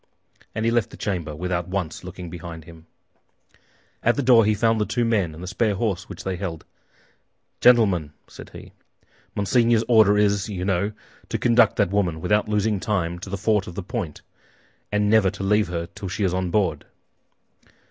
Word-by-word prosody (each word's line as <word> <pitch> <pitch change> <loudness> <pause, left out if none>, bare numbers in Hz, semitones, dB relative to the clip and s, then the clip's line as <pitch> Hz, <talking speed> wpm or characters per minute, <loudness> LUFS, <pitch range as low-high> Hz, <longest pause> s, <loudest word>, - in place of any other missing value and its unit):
And 110 +1 -1
he 115 - +2
left 120 -3 +1
the - - -12
chamber 85 -7 -3
without 90 +1 -2
once 90 -4 -4
looking 90 -1 -8
behind 85 -1 -8
him. 80 0 -15 1.1
At 120 - +2
the 145 - -1
door 120 -3 +6
he 105 0 +2
found 115 +1 +2
the - - +2
two 120 -1 0
men 100 -9 0
and 85 - -10
the - - -6
spare 110 +1 0
horse 95 -3 -2
which 100 - -8
they 95 -1 -3
held. 85 -4 -5 0.9
"Gentlemen," 100 -11 +4 0.2
said - - -12
he, - - -12 0.6
"Monseigneur's 115 +2 +2
order 110 -4 +5
is, 105 0 +1
you 90 -3 -4
know, 95 +2 0 0.4
to - - -1
conduct 120 -2 +4
that 100 -4 +1
woman, 90 -6 0
without 105 +5 +1
losing 105 -1 +1
time, 90 -4 -2
to 100 +2 -5
Fort 105 0 +1
La 90 +2 -6
Pointe, 100 - -5 0.7
and 105 0 +1
never 105 -2 +4
to 100 +1 -7
leave 105 +2 +2
her 85 -1 -3
till 100 - -7
she 100 +3 -3
is 90 -2 +1
on 90 -1 -1
board." 100 0 0
100 Hz, 180 wpm, -23 LUFS, 90-110 Hz, 1.1 s, door